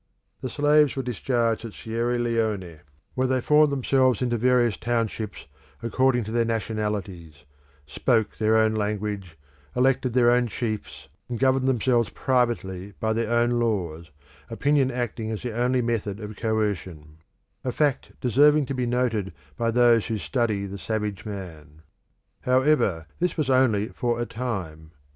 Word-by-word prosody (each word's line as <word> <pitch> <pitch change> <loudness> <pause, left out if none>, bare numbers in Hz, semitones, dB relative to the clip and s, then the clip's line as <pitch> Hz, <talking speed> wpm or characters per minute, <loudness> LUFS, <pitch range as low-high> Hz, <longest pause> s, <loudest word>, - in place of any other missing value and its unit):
The 130 - -3
slaves 145 +1 +3
were 135 - -2
discharged 120 -1 -1
at 115 -3 -7
Sierra 115 +2 -2
Leone, 110 -8 -1 0.3
where 130 0 0
they 130 0 +1
formed 150 +3 +4
themselves 130 -2 +2
into 120 -1 0
various 120 -2 +3
townships 115 -3 -3 0.4
according 125 +1 +2
to 110 - -6
their 115 0 +2
nationalities, 105 - -4 0.4
spoke 110 - 0
their 110 0 +2
own 110 0 +3
language, 105 -4 -3 0.4
elected 130 -1 +2
their 120 -1 +5
own 125 0 +3
chiefs, 110 - -5 0.2
and 120 - -3
governed 130 +1 +2
themselves 120 -3 +2
privately 105 -8 -1
by 110 0 0
their 115 0 -1
own 120 0 +3
laws, 85 -8 -2 0.4
opinion 135 +3 +2
acting 120 -3 -3
as 110 -2 -4
the 120 -3 -4
only 125 +1 +1
method 110 -3 -2
of 105 -1 -7
coercion 95 -9 -3 0.5
a 130 - -1
fact 145 +1 0
deserving 145 +4 +4
to 135 - -4
be 125 -2 -1
noted 120 -6 0 0.2
by 115 -1 0
those 120 -1 +4
who 110 - -2
study 110 -3 -1
savage 105 -2 -3
man. 80 -6 -9 0.6
However, 130 - +2
this 180 +1 -1
was 145 -4 0
only 115 -5 +3
for 120 -2 -2
a 120 - -1
time. 90 -11 -5
115 Hz, 145 wpm, -25 LUFS, 105-125 Hz, 0.6 s, their